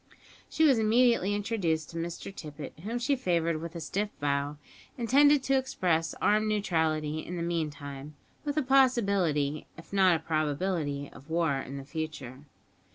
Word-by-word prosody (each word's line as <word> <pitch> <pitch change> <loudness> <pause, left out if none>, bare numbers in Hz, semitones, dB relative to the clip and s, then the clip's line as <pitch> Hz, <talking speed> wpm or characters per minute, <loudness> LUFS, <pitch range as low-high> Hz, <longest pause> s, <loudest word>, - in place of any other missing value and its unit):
She 320 - +1
was 270 -7 +5
immediately 220 -2 +3
introduced 185 -7 -1
to 165 - -7
Mr 170 +3 -5
Tippet, 150 -2 -8
whom 220 +8 -4
she 260 +4 +1
favoured 170 -8 0
with 170 +1 -7
a - - -4
stiff 200 +6 -2
bow, 145 0 -1 0.4
intended 280 +4 +4
to 270 0 +2
express 170 -10 0
armed 215 +1 +3
neutrality 160 -7 0
in 175 +3 -6
the 170 - -3
meantime; 150 -4 -4 0.3
with 290 0 -3
a 305 - +3
possibility, 200 - +2
if 165 - -13
not 190 -3 +5
a - - -1
probability, 155 -2 -1
of 140 - -15
war 165 -2 +1
in 135 +1 -6
the 135 - -8
future. 150 -4 -6
170 Hz, 160 wpm, -29 LUFS, 155-215 Hz, 0.4 s, was